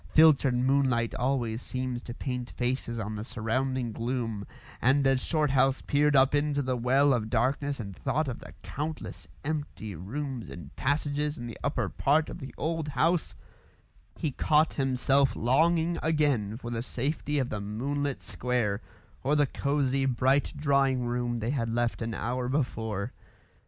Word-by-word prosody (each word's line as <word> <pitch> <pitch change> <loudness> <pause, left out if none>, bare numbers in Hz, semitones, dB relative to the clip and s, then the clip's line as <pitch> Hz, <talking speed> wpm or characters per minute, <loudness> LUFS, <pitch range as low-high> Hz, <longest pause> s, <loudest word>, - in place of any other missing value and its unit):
Filtered 145 -5 +6
moonlight 130 -2 +2
always 120 -3 0
seems 130 -2 -3
to 120 - -7
paint 125 -2 -4
faces 125 -1 -2
on 105 0 -3
the 105 - -4
surrounding 125 +2 -1
gloom, 115 -3 -3 0.3
and 135 +2 +4
as 135 -1 +3
Shorthouse 135 -4 +2
peered 145 0 +3
up 135 +1 +5
into 145 -1 +1
the 130 -1 0
well 135 +4 +4
of 110 -3 -1
darkness 135 +4 0
and 100 -4 -6
thought 155 - 0
of 125 - -4
the - - -11
countless 145 - -5 0.2
empty 145 -9 -3
rooms 120 - -5
and 80 -5 -10
passages 145 +1 0
in 120 - -6
the 115 - -7
upper - - 0
part 150 +3 +2
of - - -7
the 135 - -7
old 160 0 -1
house, 165 +3 +1 0.8
he 155 - -1
caught 155 +4 +3
himself 135 0 +2
longing 165 +7 +2
again 145 -10 +1
for 120 -1 -6
the 115 -1 -1
safety 145 +4 -2
of 130 -3 0
the 105 - -3
moonlit 135 +7 -2
square, 120 -4 -1 0.4
or 140 +3 +2
the 145 -1 +4
cosy, 135 -1 0
bright 135 +2 +2
drawing 135 -3 +2
room 120 0 -1
they 115 +2 -1
had 120 -5 -1
left 120 +1 0
an 115 -1 -2
hour 125 +1 -2
before. 115 -6 -1
130 Hz, 155 wpm, -29 LUFS, 120-145 Hz, 0.8 s, Filtered